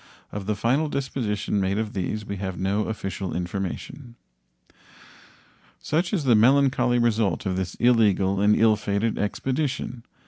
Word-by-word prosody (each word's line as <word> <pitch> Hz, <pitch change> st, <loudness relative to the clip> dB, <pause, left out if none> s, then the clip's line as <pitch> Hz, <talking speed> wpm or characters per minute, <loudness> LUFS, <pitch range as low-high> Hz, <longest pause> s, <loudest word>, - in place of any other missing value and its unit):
Of 100 Hz, -1 st, -6 dB
the 105 Hz, -, 0 dB
final 135 Hz, +9 st, +1 dB
disposition 120 Hz, -8 st, -2 dB
made 95 Hz, +1 st, 0 dB
of 110 Hz, -1 st, -2 dB
these 105 Hz, +2 st, -3 dB
we 100 Hz, -1 st, -5 dB
have 95 Hz, -2 st, -4 dB
no 100 Hz, +4 st, 0 dB
official 95 Hz, -3 st, -4 dB
information. 95 Hz, +7 st, -5 dB, 1.6 s
Such 170 Hz, +4 st, -1 dB
is 190 Hz, -8 st, 0 dB
the 130 Hz, -3 st, +4 dB
melancholy 125 Hz, +2 st, +4 dB
result 115 Hz, -3 st, +1 dB
of 95 Hz, -1 st, -1 dB
this 95 Hz, -1 st, -3 dB
illegal 100 Hz, -5 st, +3 dB
and 105 Hz, +1 st, +4 dB
ill 110 Hz, -1 st, +4 dB
fated 100 Hz, +2 st, -1 dB
expedition. 130 Hz, +2 st, -2 dB
110 Hz, 140 wpm, -24 LUFS, 100-125 Hz, 1.6 s, the